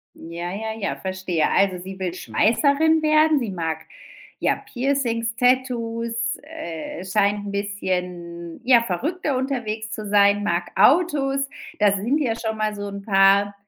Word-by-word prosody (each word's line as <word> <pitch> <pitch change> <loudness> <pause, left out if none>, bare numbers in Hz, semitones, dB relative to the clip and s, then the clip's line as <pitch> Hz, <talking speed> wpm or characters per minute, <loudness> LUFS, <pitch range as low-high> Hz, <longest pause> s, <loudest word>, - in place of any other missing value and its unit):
Ja, 170 +2 -6
ja, 220 +2 -4
ja, 205 - -2
verstehe. 190 -3 -1
Also 190 -2 +2
sie 190 +1 -8
will 180 -2 -3
Schweißerin 290 +11 +2
werden. 310 0 +4
Sie 235 -6 -3
mag, 165 -3 -2 0.6
ja, - - +1 0.2
Piercings, 240 -4 0
Tattoos, 240 -3 0 0.3
äh, 180 - -7
scheint 205 +1 +1
'n - - -4
bisschen, 180 -4 -4
ja, 245 -2 +6
verrückter 275 - -2
unterwegs 225 -5 -3
zu 215 -2 -5
sein, 205 0 +4
mag 175 -3 -1
Autos. 275 - +3 0.3
Das 205 -1 +4
sind 240 +10 0
ja 235 -6 0
schon 220 -1 -3
mal 215 -1 -1
so 205 0 -5
'n 200 0 -7
paar 200 0 +4
210 Hz, 145 wpm, -23 LUFS, 190-255 Hz, 0.6 s, ja